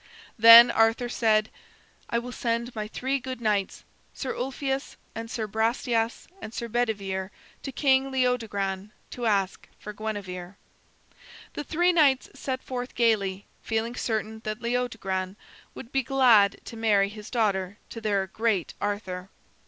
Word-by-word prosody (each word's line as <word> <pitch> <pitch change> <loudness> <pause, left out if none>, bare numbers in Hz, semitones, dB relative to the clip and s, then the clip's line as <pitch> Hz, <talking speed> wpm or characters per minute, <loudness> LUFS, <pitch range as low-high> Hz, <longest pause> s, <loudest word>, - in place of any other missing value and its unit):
Then 230 +1 +10
Arthur 225 +2 +2
said: 220 -2 +2 0.6
"I 235 - 0
will 240 +1 -4
send 235 0 -2
my 215 -1 -4
three 265 +5 -2
good 255 0 -6
knights, 210 -4 -1 0.3
Sir 265 - -3
Ulfius 270 +1 -3 0.2
and 225 0 -6
Sir 225 -2 -3
Brastias 225 +2 -1
and 220 - -8
Sir 235 - -3
Bedivere, 200 -5 -2 0.3
to 270 - -5
King 265 0 +2
Leodogran 215 -7 -1 0.2
to 240 -2 -3
ask 195 -3 0
for 210 - -8
Guinevere." 200 -4 -6 1.0
The 295 - -4
three 350 +5 +2
knights 280 -6 +3
set 260 -1 -4
forth 250 -1 -5
gayly, 205 -5 +1 0.2
feeling 225 +1 -2
certain 220 -1 -3
that 215 +1 -4
King 235 0 -3
Leodogran 195 -6 -2 0.4
would 235 - -10
be 270 - +2
glad 240 -6 +4
to 230 - -8
marry 210 -3 +2
his 210 0 -10
daughter 200 -5 0
to 230 - -7
their 200 -3 0
great 210 -2 -1
Arthur. 195 -3 -3
225 Hz, 145 wpm, -26 LUFS, 205-245 Hz, 1.0 s, Then